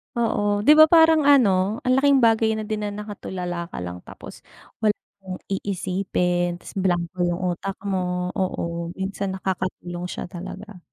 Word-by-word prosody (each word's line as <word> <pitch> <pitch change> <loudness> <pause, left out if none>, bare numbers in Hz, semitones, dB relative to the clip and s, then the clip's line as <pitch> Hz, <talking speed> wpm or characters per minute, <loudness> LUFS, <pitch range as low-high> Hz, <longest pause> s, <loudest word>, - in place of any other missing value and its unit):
Oo, 205 -3 +1
'di 295 - +6
ba 315 - +10
parang 320 -2 +5
ano 210 -6 +4
ang 255 - +2
laking 275 -3 +4
bagay 225 -1 +3
na 215 - -3
din 215 0 -3
na 210 - -1
nakatulala 185 -4 -5
ka - - -7
lang, 90 0 -6
tapos - - -11 0.4
wala 210 -1 +3 0.3
kang 185 -1 -6
iisipin, 180 -2 -1
tas - - -12
blanko 175 -1 -1
yung 175 0 -1 0.2
utak 195 +2 -5
mo. 180 -2 -2
Oo, 170 -3 -2
minsan 190 0 -3
nakakatulong 185 -2 -4
siya - - -6
talaga. 195 +2 -8
190 Hz, 155 wpm, -23 LUFS, 180-215 Hz, 0.4 s, ba